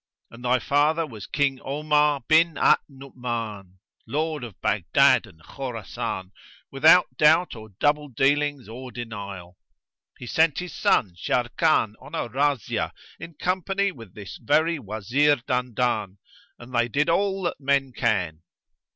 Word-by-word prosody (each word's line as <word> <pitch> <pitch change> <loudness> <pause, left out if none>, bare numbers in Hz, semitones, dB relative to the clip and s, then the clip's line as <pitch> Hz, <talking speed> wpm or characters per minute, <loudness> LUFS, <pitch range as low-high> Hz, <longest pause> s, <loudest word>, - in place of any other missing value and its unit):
And 115 +1 -13
thy 125 +1 +3
father 150 +6 +1
was 110 -9 -10
King 140 -2 0
Omar 150 0 +1
bin 165 +1 +4
al - - +5
Nu'uman, 120 -8 -6 0.3
Lord 155 -1 -2
of 115 -6 -9
Baghdad - - +3
and 80 -1 -19
Khorasan, 115 - -5 0.4
without 160 +6 +5
doubt 160 +1 +4
or 110 -1 -11
double 150 0 +2
dealing 140 0 0
or 125 +3 -9
denial. 100 -7 -8 0.6
He - - -9
sent 160 +4 +2
his 180 -1 -5
son 95 -6 +1
Sharrkan 120 - +1
on 150 - -9
a 160 - -2
razzia 135 -1 -1 0.3
in 165 0 -9
company 190 +4 -1
with 115 - -14
this 100 -3 -9
very 155 +6 +1
Wazir 125 +7 +1
Dandan; 125 -6 -2 0.4
and 120 +1 -13
they 120 0 +2
did 145 +5 0
all 195 +3 +1
that 175 - -2
men 135 -2 +1
can. 90 -10 -1
135 Hz, 135 wpm, -24 LUFS, 115-150 Hz, 0.6 s, al